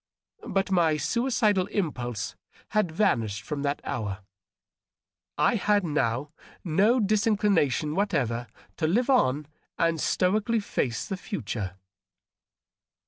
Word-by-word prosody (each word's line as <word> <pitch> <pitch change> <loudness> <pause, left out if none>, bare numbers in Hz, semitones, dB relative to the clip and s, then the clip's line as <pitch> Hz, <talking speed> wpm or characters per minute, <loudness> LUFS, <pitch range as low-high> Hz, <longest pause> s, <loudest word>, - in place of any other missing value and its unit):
But 195 0 0
my 165 -4 +3
suicidal 220 - +1
impulse 120 - -3 0.3
had 210 -5 +1
vanished 115 - +1
from 145 +4 -4
that 145 0 -1
hour. 105 -3 -3 1.2
I 245 - +3
had 205 -2 +2
now 145 -3 -1 0.3
no 200 +9 +3
disinclination 200 - +2
whatever 125 - 0 0.3
to 160 - +1
live 240 - +2
on 150 - +3 0.3
and 165 -1 +1
stoically 215 +5 +1
face 125 - -2
the 195 -3 -4
ftiture. 110 - -4
165 Hz, 105 wpm, -27 LUFS, 130-210 Hz, 1.2 s, my